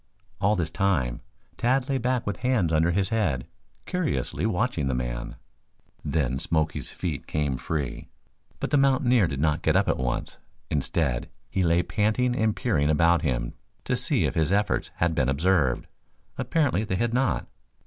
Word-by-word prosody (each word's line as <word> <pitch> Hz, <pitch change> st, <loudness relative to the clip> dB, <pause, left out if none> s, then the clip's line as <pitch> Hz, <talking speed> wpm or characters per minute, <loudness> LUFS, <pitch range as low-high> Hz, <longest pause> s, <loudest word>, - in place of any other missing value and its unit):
All 100 Hz, +2 st, +3 dB
this 85 Hz, -3 st, -2 dB
time 80 Hz, -12 st, 0 dB, 0.4 s
Tad 125 Hz, +2 st, +1 dB
lay 135 Hz, -2 st, 0 dB
back 125 Hz, 0 st, 0 dB
with 100 Hz, -3 st, -2 dB
hands 110 Hz, -10 st, +1 dB
under 80 Hz, +2 st, +3 dB
his 95 Hz, +2 st, +1 dB
head, 90 Hz, -, 0 dB, 0.4 s
curiously 180 Hz, -, -1 dB
watching 100 Hz, -, 0 dB
the 65 Hz, -, 0 dB
man. -, -, -4 dB, 0.7 s
Then 70 Hz, -4 st, 0 dB
Smoky's 80 Hz, +1 st, -1 dB
feet 80 Hz, -6 st, -4 dB
came 75 Hz, -3 st, -1 dB
free, 70 Hz, 0 st, -4 dB, 0.5 s
but -, -, -3 dB
the 145 Hz, -, +4 dB
mountaineer 130 Hz, -, +4 dB
did 70 Hz, -4 st, -4 dB
not 75 Hz, 0 st, +1 dB
get -, -, +2 dB
up -, -, +3 dB
at -, -, +1 dB
once. 60 Hz, -2 st, -3 dB, 0.3 s
Instead, 70 Hz, -3 st, 0 dB, 0.2 s
he 95 Hz, -, 0 dB
lay 85 Hz, 0 st, +3 dB
panting 115 Hz, +5 st, +1 dB
and 110 Hz, -3 st, +1 dB
peering 80 Hz, -, +1 dB
about 85 Hz, +2 st, +4 dB
him -, -, -1 dB, 0.3 s
to -, -, 0 dB
see -, -, +1 dB
if -, -, 0 dB
his 80 Hz, +1 st, +1 dB
efforts 105 Hz, +1 st, +1 dB
had 85 Hz, 0 st, +1 dB
been 65 Hz, -4 st, +1 dB
observed. 75 Hz, -3 st, +2 dB, 0.5 s
Apparently 145 Hz, -10 st, +1 dB
they 100 Hz, -4 st, -2 dB
had 115 Hz, +4 st, 0 dB
not. 130 Hz, +1 st, +1 dB
85 Hz, 165 wpm, -26 LUFS, 75-115 Hz, 0.7 s, the